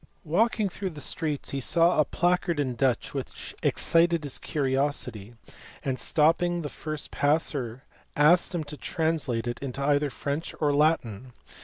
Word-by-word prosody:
Walking 215 Hz, +6 st, +2 dB
through 190 Hz, +1 st, -4 dB
the 155 Hz, -4 st, -10 dB
streets 150 Hz, 0 st, -2 dB
he 140 Hz, -, -2 dB
saw 170 Hz, +5 st, +3 dB
a 155 Hz, -, +5 dB
placard 175 Hz, -2 st, +1 dB
in 130 Hz, -3 st, 0 dB
Dutch 125 Hz, 0 st, 0 dB
which -, -, -6 dB
excited 170 Hz, -1 st, +2 dB
his 140 Hz, -3 st, -5 dB
curiosity, 130 Hz, -6 st, -2 dB, 0.5 s
and 130 Hz, -2 st, -1 dB
stopping 170 Hz, +2 st, +2 dB
the 145 Hz, -, -3 dB
first 155 Hz, 0 st, -6 dB
passer 140 Hz, -4 st, 0 dB, 0.3 s
asked 170 Hz, +5 st, +4 dB
him 165 Hz, -, -1 dB
to 150 Hz, 0 st, -8 dB
translate 155 Hz, -9 st, -1 dB
it 120 Hz, 0 st, -3 dB
into 140 Hz, 0 st, -4 dB
either 145 Hz, 0 st, +2 dB
French 145 Hz, +4 st, -4 dB
or 150 Hz, -2 st, +2 dB
Latin. 130 Hz, -6 st, +1 dB
150 Hz, 150 wpm, -27 LUFS, 135-165 Hz, 0.5 s, a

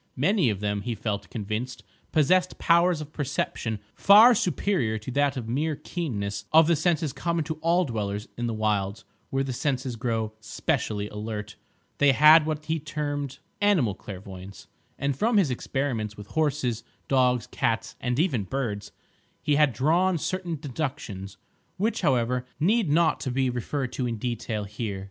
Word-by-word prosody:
Many 175 Hz, -, +2 dB
of 100 Hz, -2 st, -2 dB
them, 100 Hz, -1 st, -1 dB
he 120 Hz, +2 st, -3 dB
felt 100 Hz, -3 st, -3 dB
convinced, 115 Hz, +3 st, -4 dB, 0.3 s
possessed 180 Hz, +4 st, +3 dB
powers 170 Hz, -1 st, +3 dB
of 155 Hz, 0 st, -9 dB
perception 130 Hz, -5 st, -2 dB, 0.2 s
far 215 Hz, +5 st, +8 dB
superior 180 Hz, -, 0 dB
to 110 Hz, +4 st, -7 dB
that 140 Hz, -3 st, 0 dB
mere 150 Hz, +6 st, 0 dB
keenness 100 Hz, -, -4 dB
of 160 Hz, +1 st, +7 dB
the 170 Hz, +1 st, +3 dB
senses 155 Hz, -3 st, 0 dB
common 170 Hz, -2 st, -1 dB
to 155 Hz, 0 st, -5 dB
all 170 Hz, +2 st, +3 dB
dwellers 105 Hz, -3 st, -3 dB
in 120 Hz, 0 st, -2 dB
the 115 Hz, -, -2 dB
wilds 105 Hz, -1 st, -1 dB, 0.2 s
where 135 Hz, 0 st, 0 dB
the 135 Hz, -1 st, -3 dB
senses 130 Hz, -1 st, -1 dB
grow 110 Hz, -2 st, -2 dB
specially 105 Hz, -1 st, -2 dB
alert; 105 Hz, 0 st, -5 dB, 0.4 s
they 145 Hz, -1 st, +5 dB
had 150 Hz, +3 st, +7 dB
what 155 Hz, -1 st, -3 dB
he 160 Hz, +1 st, -1 dB
termed 145 Hz, -2 st, -4 dB, 0.2 s
"animal 180 Hz, -, +3 dB
clairvoyance," 95 Hz, 0 st, -10 dB, 0.3 s
and 140 Hz, 0 st, -1 dB
from 220 Hz, -, +2 dB
his 175 Hz, -10 st, +3 dB
experiments 120 Hz, -4 st, -2 dB
with 105 Hz, -, -8 dB
horses, 145 Hz, -7 st, 0 dB, 0.2 s
dogs, 125 Hz, -3 st, +2 dB
cats, -, -, -1 dB
and 125 Hz, 0 st, -1 dB
even 140 Hz, -, +1 dB
birds, 110 Hz, -5 st, -3 dB, 0.5 s
he 150 Hz, -, +2 dB
had 150 Hz, -1 st, +4 dB
drawn 165 Hz, -, +2 dB
certain 180 Hz, +1 st, -2 dB
deductions, 135 Hz, -, -5 dB, 0.4 s
which, 215 Hz, +5 st, 0 dB
however, 125 Hz, -4 st, +1 dB
need 205 Hz, +2 st, +2 dB
not 155 Hz, -4 st, +2 dB
be 130 Hz, -1 st, +2 dB
referred 125 Hz, +2 st, -3 dB
to 125 Hz, -, -1 dB
in 115 Hz, -1 st, -3 dB
detail 115 Hz, -2 st, -3 dB
here. 100 Hz, -1 st, -4 dB
130 Hz, 155 wpm, -26 LUFS, 110-155 Hz, 0.5 s, far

